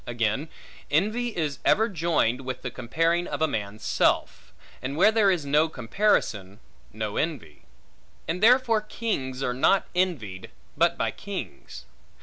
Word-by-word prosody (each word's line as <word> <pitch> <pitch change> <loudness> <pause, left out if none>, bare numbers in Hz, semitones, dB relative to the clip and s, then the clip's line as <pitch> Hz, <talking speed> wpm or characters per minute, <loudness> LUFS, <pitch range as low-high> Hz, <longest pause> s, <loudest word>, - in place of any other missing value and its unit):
Again, 120 +5 -1 0.4
envy 215 +11 +1
is 150 -5 -2
ever 220 +2 +3
joined 160 - 0
with 130 -1 -6
the 125 - -4
comparing 165 +9 0
of - - -4
a 160 - +3
man's 105 -4 -5
self; - - 0 0.3
and 135 +3 -4
where 200 +5 +6
there 220 -3 +4
is 175 -6 0
no 150 +3 +3
comparison, 115 - 0 0.3
no 110 -1 -4
envy; 135 - -4 0.6
and 175 +3 -2
therefore 235 -1 +5
kings 140 - -3
are 125 - 0
not 135 +10 +3
envied, 140 - -2 0.3
but - - +2
by - - 0
kings. 65 - -8
150 Hz, 140 wpm, -26 LUFS, 115-185 Hz, 0.6 s, where